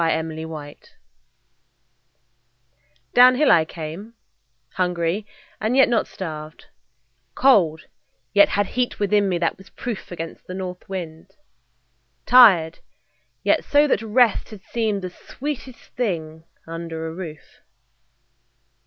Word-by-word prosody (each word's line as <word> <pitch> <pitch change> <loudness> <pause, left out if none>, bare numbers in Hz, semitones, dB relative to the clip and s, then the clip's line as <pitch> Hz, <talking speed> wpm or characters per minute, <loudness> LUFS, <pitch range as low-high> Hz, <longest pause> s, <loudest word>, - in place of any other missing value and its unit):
W 165 - +2
X. 160 0 -5
Y 150 -2 -7
Z - - -22 2.3
The 245 - +6
Owl 250 - +10
DOWNHILL 280 +3 +3
I 160 -2 +5
came, 165 +8 -8 0.6
hungry, 180 +2 -1 0.3
and 225 +4 0
yet 270 - +7
not 235 -2 +1
starved, 155 -4 -8 0.7
Cold, 180 - +4 0.5
yet 200 0 +6
had 205 0 +1
heat 250 -1 -2
within 205 -1 +2
me 180 - 0
that 170 +2 -1
was 195 - -15
proof 230 -7 -6
Against 165 -2 -7
the 185 - -6
north 185 -1 -7
wind; 180 0 -7 0.9
tired, 190 -11 +6 0.6
yet - - +2
so 290 +1 +4
that 275 - +1
rest 225 0 +2
Had 210 -3 -12
seemed 215 -4 -2
the 185 - -5
sweetest 260 +3 -8
thing 160 -9 -3 0.2
under 165 -1 -6
a 160 - -5
roof. 165 -4 -10
185 Hz, 125 wpm, -22 LUFS, 165-225 Hz, 2.3 s, Owl